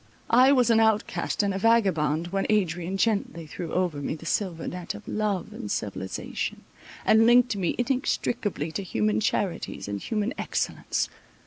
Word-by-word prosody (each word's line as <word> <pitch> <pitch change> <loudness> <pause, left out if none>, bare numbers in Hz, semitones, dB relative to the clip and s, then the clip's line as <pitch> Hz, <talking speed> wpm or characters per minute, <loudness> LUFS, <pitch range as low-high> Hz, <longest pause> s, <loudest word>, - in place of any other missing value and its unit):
I 255 +3 +7
was 250 -4 +4
an 225 - +5
outcast 220 -1 +1
and 200 -1 0
a 190 - -2
vagabond, 175 -8 +2
when 195 +1 -1
Adrian 185 -3 0
gently 200 -6 0
threw 165 +2 -6
over 175 -6 0
me 145 - -2
the 160 - -12
silver 170 -2 -1
net 180 -7 -5
of 105 - -11
love 210 -3 -2
and 105 - -7
civilization, 95 -2 -4 0.4
and 225 +1 +5
linked 245 -1 +5
me 185 -4 -1
inextricably 240 - -1
to 200 - -3
human 105 - 0
charities - - -2
and 100 -1 -4
human 215 +2 -1
excellence. - - -1
195 Hz, 155 wpm, -26 LUFS, 160-225 Hz, 0.4 s, I